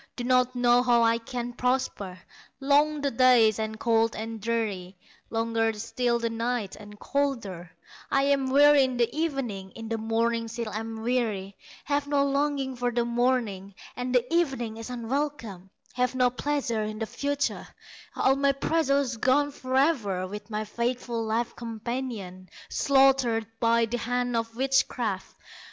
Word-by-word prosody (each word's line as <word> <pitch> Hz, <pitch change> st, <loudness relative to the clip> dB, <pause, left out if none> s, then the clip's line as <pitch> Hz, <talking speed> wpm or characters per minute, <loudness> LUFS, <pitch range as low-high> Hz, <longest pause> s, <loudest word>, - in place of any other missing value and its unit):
Do 245 Hz, -, -4 dB
not 255 Hz, 0 st, +2 dB
know 245 Hz, 0 st, +4 dB
how 240 Hz, -2 st, +4 dB
I 230 Hz, 0 st, +3 dB
can 240 Hz, +1 st, -5 dB
prosper; 250 Hz, -7 st, -1 dB, 0.4 s
Long 290 Hz, +2 st, +3 dB
the 280 Hz, -1 st, 0 dB
days, 230 Hz, -3 st, +5 dB
and 220 Hz, 0 st, -3 dB
cold, 225 Hz, -1 st, +2 dB
and 225 Hz, 0 st, -6 dB
dreary, 200 Hz, -5 st, -2 dB, 0.3 s
Longer 225 Hz, 0 st, 0 dB
still 230 Hz, +3 st, -1 dB
the 235 Hz, 0 st, -1 dB
nights, 230 Hz, -3 st, -2 dB
and 210 Hz, 0 st, -13 dB
colder; 230 Hz, -11 st, -2 dB, 0.4 s
I 275 Hz, -, +2 dB
am 275 Hz, -1 st, +2 dB
weary 290 Hz, +1 st, +6 dB
in 260 Hz, -1 st, -1 dB
the 235 Hz, +2 st, +1 dB
evening, 270 Hz, -12 st, -2 dB
In 225 Hz, -1 st, -7 dB
the 225 Hz, -1 st, -2 dB
morning 230 Hz, +1 st, 0 dB
still 230 Hz, -1 st, -5 dB
am 225 Hz, +1 st, -5 dB
weary, 220 Hz, -6 st, -1 dB, 0.3 s
Have 285 Hz, 0 st, -1 dB
no 285 Hz, -1 st, +2 dB
longing 280 Hz, -1 st, 0 dB
for 245 Hz, 0 st, -1 dB
the 240 Hz, 0 st, 0 dB
morning, 235 Hz, -5 st, 0 dB, 0.2 s
And 250 Hz, 0 st, -2 dB
the 245 Hz, -1 st, +3 dB
evening 265 Hz, -10 st, 0 dB
is 225 Hz, +2 st, -7 dB
unwelcome; 240 Hz, -6 st, -4 dB, 0.2 s
Have 250 Hz, +1 st, 0 dB
no 250 Hz, -1 st, +3 dB
pleasure 260 Hz, -4 st, -1 dB
in 215 Hz, 0 st, -4 dB
the 225 Hz, -, -2 dB
future, 285 Hz, +4 st, -2 dB, 0.5 s
All 270 Hz, -, +3 dB
my 275 Hz, 0 st, +2 dB
pleasures 275 Hz, -4 st, +1 dB
gone 285 Hz, +5 st, +2 dB
forever, 255 Hz, -, 0 dB
With 205 Hz, +3 st, -8 dB
my 215 Hz, 0 st, -3 dB
faithful 235 Hz, +1 st, -2 dB
life 225 Hz, +2 st, -1 dB
companion 225 Hz, -5 st, -5 dB, 0.2 s
Slaughtered 265 Hz, -5 st, +3 dB
by 230 Hz, 0 st, +3 dB
the 240 Hz, +2 st, -3 dB
hand 245 Hz, 0 st, -1 dB
of 230 Hz, 0 st, -2 dB
witchcraft! 245 Hz, -6 st, 0 dB
240 Hz, 150 wpm, -27 LUFS, 225-265 Hz, 0.5 s, weary